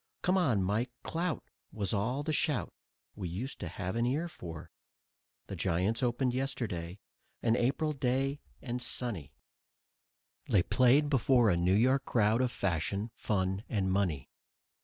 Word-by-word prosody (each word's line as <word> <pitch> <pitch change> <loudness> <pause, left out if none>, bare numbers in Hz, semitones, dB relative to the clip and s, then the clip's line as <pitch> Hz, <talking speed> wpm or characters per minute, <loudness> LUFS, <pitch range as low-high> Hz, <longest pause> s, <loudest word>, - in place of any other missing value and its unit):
"Come 185 - +3
on, 130 - +2
Mike, 105 +6 0
clout!" 170 0 -2 0.3
was 100 -2 -2
all 120 +8 0
the 155 +1 -1
shout 145 - 0 0.4
We 95 -4 -4
used 110 +11 -5
to - - -4
have 95 +3 -4
an 115 +1 +1
ear 150 +7 0
for. 85 - -9 0.7
The - - -6
Giants 95 +6 0
opened 125 0 +1
yesterday, 110 -10 -3 0.5
an 115 -1 +3
April 140 +6 +1
day 135 +1 0 0.2
and 125 -1 -3
sunny; 115 - -3 1.2
They 95 -4 +4
played 130 +6 +4
before 125 -4 +4
a - - +3
New 90 +2 +3
York 130 +5 +3
crowd 110 -1 +2
of 130 - +2
fashion, 100 +4 -1
fun 95 -1 -1
and 95 -4 0
money. 90 -9 0
115 Hz, 145 wpm, -31 LUFS, 95-130 Hz, 1.2 s, They